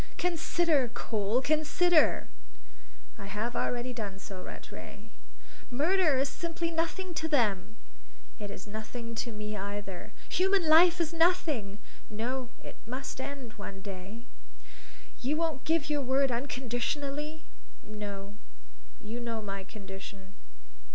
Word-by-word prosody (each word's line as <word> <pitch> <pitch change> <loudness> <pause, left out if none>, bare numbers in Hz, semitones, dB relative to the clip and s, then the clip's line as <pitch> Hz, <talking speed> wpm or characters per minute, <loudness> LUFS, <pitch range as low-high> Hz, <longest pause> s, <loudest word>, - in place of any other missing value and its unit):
"Consider, 335 -5 +3
Cole, 220 +2 +1
consider!" 310 +2 +4 0.9
"I 200 - -6
have 215 +4 -2
already 245 +1 0
done 205 -5 -4
so, 195 -1 -7
Rattray." - - -9 0.6
"Murder 310 +3 +4
is 270 +2 +3
simply 335 +1 -2
nothing 335 +3 -1
to 320 -1 -1
them!" 215 - +2 0.6
"It 205 -1 -4
is 200 -1 -7
nothing 220 +3 -5
to 235 - -4
me 210 0 -4
either." 200 -2 -5 0.2
"Human 375 -1 +3
life 340 +3 +8
is 335 -1 +1
nothing!" 320 - +3 0.3
"No; 245 +4 -2
it - - -9
must 260 +2 -4
end 265 -5 -5
one 195 -1 -7
day." 200 +3 -7 1.0
"You 285 +5 +1
won't 320 -5 0
give 325 -1 +3
your 295 -1 +1
word 270 0 +3
unconditionally?" 280 +5 -2 0.4
"No; 205 -1 -6 0.7
you 225 +3 -4
know 230 -2 -2
my 195 -1 -4
condition." 195 -1 -9
245 Hz, 120 wpm, -31 LUFS, 210-310 Hz, 1.0 s, life